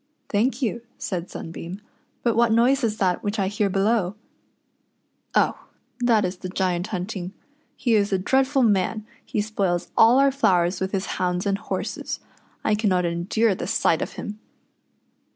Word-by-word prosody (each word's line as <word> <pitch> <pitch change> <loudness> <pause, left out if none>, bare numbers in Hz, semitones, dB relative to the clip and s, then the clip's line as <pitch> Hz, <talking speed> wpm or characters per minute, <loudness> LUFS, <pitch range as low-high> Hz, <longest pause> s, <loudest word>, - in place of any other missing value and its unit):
" - - -47
Thank 235 +5 +1
you," 235 0 -1 0.2
said 180 -2 -4
Sunbeam; 170 +3 -7 0.2
" - - -43
but 235 -2 +2
what 235 0 +4
noise 245 +4 +3
is 220 -2 0
that 185 -3 +1
which 205 +2 -2
I 195 -2 +1
hear 205 0 0
below 195 0 +1 0.4
} - - -47
" - - -29
"Oh! - - +1 0.3
that 230 -4 +3
is 180 +1 -3
the 185 - -6
Giant 180 -1 -1
hunting. 185 -1 -4 0.4
He 240 -4 0
is 205 -2 +3
a 190 - +3
dreadful 265 +7 +2
man 210 0 +1
— - - -31
he 210 - -1
spoils 195 -5 -1
all 230 +3 +6
our 275 0 +5
flowers 180 -9 +2
with 190 0 -1
his 195 -1 -1 0.2
hounds 180 +1 0
and 200 0 0
horses. - - -4 0.4
I 215 - +2
cannot 195 -4 +2
endure 185 +6 +1
the 180 - -5
sight 170 -6 +2
of - - -4
him." 210 +1 -7
205 Hz, 180 wpm, -24 LUFS, 185-225 Hz, 0.4 s, all